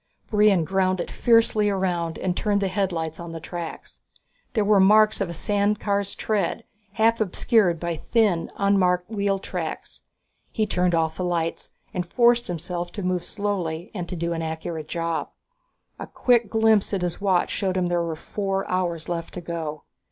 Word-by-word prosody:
Brion 210 Hz, -4 st, +4 dB
ground 185 Hz, +1 st, +1 dB
it -, -, -4 dB
fiercely 225 Hz, -3 st, +3 dB
around 180 Hz, -4 st, -1 dB
and 180 Hz, -1 st, -1 dB
turned 205 Hz, 0 st, +1 dB
the 195 Hz, -1 st, 0 dB
headlights 170 Hz, -5 st, -2 dB
on 170 Hz, -1 st, -7 dB
the 165 Hz, -, -5 dB
tracks. 170 Hz, 0 st, -7 dB, 0.5 s
There 215 Hz, -2 st, +2 dB
were 210 Hz, 0 st, +5 dB
the 190 Hz, -, +6 dB
marks 215 Hz, +1 st, +5 dB
of 195 Hz, -, -1 dB
a -, -, -4 dB
sand 205 Hz, +4 st, +1 dB
car's 200 Hz, -1 st, 0 dB
treads, 215 Hz, +1 st, -1 dB, 0.3 s
half 225 Hz, +1 st, +2 dB
obscured 195 Hz, -3 st, +2 dB
by 170 Hz, -1 st, -3 dB
thin, 205 Hz, -4 st, +1 dB
unmarked 185 Hz, -1 st, +2 dB
wheel 200 Hz, -2 st, 0 dB
tracks. 195 Hz, -, -6 dB, 0.5 s
He 215 Hz, -, 0 dB
turned 180 Hz, -3 st, +1 dB
off 160 Hz, -1 st, 0 dB
the 185 Hz, -, -2 dB
lights 170 Hz, -2 st, -2 dB, 0.2 s
and 180 Hz, -, -1 dB
forced 240 Hz, +6 st, +3 dB
himself 175 Hz, 0 st, -4 dB
to 205 Hz, -, -5 dB
move 180 Hz, -1 st, 0 dB
slowly 185 Hz, -5 st, -3 dB
and 180 Hz, -5 st, -5 dB
to 185 Hz, -, -4 dB
do 170 Hz, 0 st, -2 dB
an 165 Hz, -, -3 dB
accurate 160 Hz, -1 st, -4 dB
job. 165 Hz, 0 st, -2 dB, 0.7 s
A -, -, -6 dB
quick 240 Hz, -4 st, +2 dB
glimpse 220 Hz, -2 st, +3 dB
at 185 Hz, -, -2 dB
his 175 Hz, +2 st, -3 dB
watch 190 Hz, -3 st, +2 dB
showed 190 Hz, -2 st, -1 dB
him 180 Hz, -, +1 dB
there 175 Hz, 0 st, +1 dB
were 165 Hz, -1 st, -2 dB
four 195 Hz, +3 st, -3 dB
hours 175 Hz, -3 st, -1 dB
left 170 Hz, -1 st, -4 dB
to 180 Hz, -, -5 dB
go. 160 Hz, -3 st, -5 dB
185 Hz, 180 wpm, -24 LUFS, 170-205 Hz, 0.7 s, the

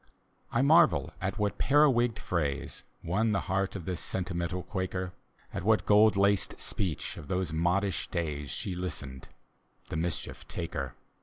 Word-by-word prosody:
I 120 Hz, -, +2 dB
marvel 140 Hz, -, +5 dB
much 95 Hz, +3 st, -2 dB
what 105 Hz, -2 st, -1 dB
periwigged 130 Hz, -5 st, +4 dB
phrase 75 Hz, -6 st, -2 dB, 0.2 s
Won 105 Hz, +6 st, +1 dB
the 100 Hz, -, +1 dB
heart 95 Hz, 0 st, -1 dB
of 90 Hz, -5 st, -5 dB
this 90 Hz, -2 st, -2 dB
sentimental 90 Hz, -1 st, -2 dB
Quaker, 95 Hz, -1 st, -3 dB, 0.4 s
At -, -, -2 dB
what 110 Hz, +2 st, +3 dB
gold 105 Hz, 0 st, +6 dB
laced 100 Hz, 0 st, +2 dB
speech 90 Hz, -7 st, -2 dB
of 75 Hz, -, -9 dB
those 90 Hz, -3 st, -1 dB
modish 90 Hz, +4 st, +1 dB
days 75 Hz, -5 st, -2 dB
She 90 Hz, +9 st, -3 dB
listened, 70 Hz, -7 st, -5 dB, 0.3 s
— -, -, -32 dB
the -, -, -3 dB
mischief 85 Hz, +1 st, -3 dB
take 85 Hz, -2 st, -5 dB
her! 70 Hz, -5 st, -3 dB
95 Hz, 155 wpm, -30 LUFS, 85-105 Hz, 0.4 s, gold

